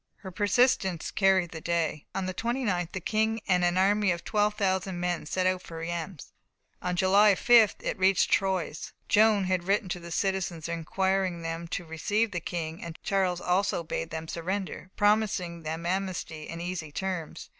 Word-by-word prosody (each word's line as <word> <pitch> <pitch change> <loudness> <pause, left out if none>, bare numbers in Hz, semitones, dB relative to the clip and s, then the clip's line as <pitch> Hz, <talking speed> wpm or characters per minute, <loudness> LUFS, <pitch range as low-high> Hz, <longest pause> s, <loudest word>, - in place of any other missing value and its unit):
Her 190 - -8
persistence 205 -3 +2
carried 190 -3 +3
the 160 - -7
day. 165 -3 -1
On 195 - -1
the 185 - -3
29th, 210 -6 -1
the 190 - -2
King 220 +4 0
and 180 -2 +3
an 175 +1 +2
army 205 +2 +3
of 170 -1 -1
12,000 200 -3 0
men 175 -3 -2
set 185 +3 0
out 185 0 +1
for 165 - -9
Reims. 165 0 -5 0.5
On 180 0 -1
July 195 +3 +5
5th 230 -1 +5
it - - -3
reached 190 +1 +3
Troyes. 185 -5 0
Joan 215 -1 +4
had 185 -1 0
written 195 0 +1
to 180 -1 -3
the 170 0 -9
citizens, 180 -3 -1
requiring 180 +1 -1
them 165 +1 -4
to 180 +1 -4
receive 205 +7 0
the 175 - -2
King, 165 -1 -5
and 165 -1 -7
Charles 185 -3 +1
also 180 -1 +1
bade 80 - -4
them 160 0 -5
surrender, 185 +3 -4
promising 205 -5 +1
them 160 +1 -5
amnesty 180 -4 -3
and 165 +1 -5
easy 175 -4 -4
terms. 180 -1 -4
185 Hz, 170 wpm, -28 LUFS, 170-195 Hz, 0.5 s, July